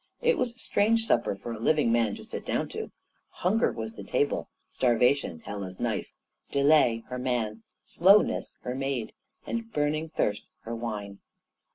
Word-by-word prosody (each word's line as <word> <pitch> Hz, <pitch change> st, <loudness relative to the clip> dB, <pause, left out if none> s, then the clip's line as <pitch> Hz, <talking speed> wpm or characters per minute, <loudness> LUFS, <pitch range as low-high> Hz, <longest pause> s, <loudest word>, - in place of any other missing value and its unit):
It 485 Hz, 0 st, +3 dB
was 240 Hz, -2 st, -1 dB
a -, -, -27 dB
strange 225 Hz, -1 st, +2 dB
supper 120 Hz, -, +2 dB
for 120 Hz, +4 st, -7 dB
a 110 Hz, -, -7 dB
living 145 Hz, 0 st, +3 dB
man 115 Hz, -3 st, +2 dB
to -, -, -10 dB
sit -, -, -6 dB
down -, -, -1 dB
to. -, -, -5 dB, 0.4 s
Hunger 215 Hz, +7 st, +1 dB
was 110 Hz, 0 st, -5 dB
the 100 Hz, -, -9 dB
table; 145 Hz, +8 st, 0 dB, 0.2 s
Starvation, 125 Hz, -, +2 dB
Hela's 95 Hz, -3 st, -6 dB
knife; -, -, -2 dB, 0.4 s
Delay, 140 Hz, -5 st, +4 dB
her 125 Hz, 0 st, -4 dB
man; 115 Hz, -4 st, -1 dB, 0.2 s
Slowness, 195 Hz, +5 st, +4 dB
her 125 Hz, -, -3 dB
maid; 135 Hz, -3 st, -2 dB, 0.3 s
and 230 Hz, -1 st, -4 dB
Burning 150 Hz, 0 st, 0 dB
Thirst, 105 Hz, -8 st, -1 dB
her 115 Hz, -, -6 dB
wine. 105 Hz, -4 st, -5 dB
125 Hz, 160 wpm, -28 LUFS, 110-155 Hz, 0.4 s, Delay